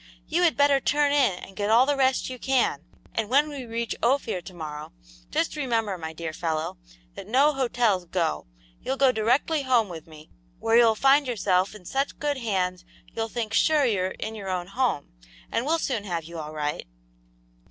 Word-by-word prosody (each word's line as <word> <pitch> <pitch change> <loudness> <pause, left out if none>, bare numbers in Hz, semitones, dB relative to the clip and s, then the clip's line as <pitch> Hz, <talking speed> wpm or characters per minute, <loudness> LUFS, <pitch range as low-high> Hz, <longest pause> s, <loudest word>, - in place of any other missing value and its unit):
You 335 +3 0
had 345 -3 +3
better 285 -1 +4
turn 290 +1 +2
in 275 -8 +3
and 195 - -16
get 205 +1 -2
all 235 +4 +6
the 290 +1 +1
rest 265 -1 +2
you 255 -1 -7
can, 265 0 +1 0.3
and 220 -2 -2
when 285 +4 +3
we 280 -4 -6
reach 230 0 -3
Ophir 235 -6 +1
to 185 - -11
morrow, 150 - -7 0.4
just 165 - -1
remember, 230 -8 -1
my 160 -2 -6
dear 160 0 -6
fellow, 160 - -3 0.3
that - - -9
no 275 +7 +4
hotels 240 -8 +1
'go.' 165 - -1 0.3
You'll 265 - -2
go 270 -1 +5
directly 250 +7 +1
home 245 -6 +2
with 165 -2 -9
me, 155 -1 -14 0.3
where 225 - +1
you'll 230 -2 +6
find 275 +4 +4
yourself 195 -4 +1
in 195 -4 -13
such 275 +8 -2
good 290 -1 -1
hands 185 -6 -1 0.3
you'll 225 0 -2
think 225 -2 -4
sure 305 +1 +4
you're 195 -6 +1
in 220 +3 -6
your 200 -3 -6
own 180 -1 -3
home, 240 - -1 0.4
and 240 - -1
we'll 325 +2 +3
soon 255 -9 -2
have 170 -4 -3
you 165 +1 -8
all 155 -1 -6
right." 150 - -3
225 Hz, 195 wpm, -26 LUFS, 180-270 Hz, 0.4 s, all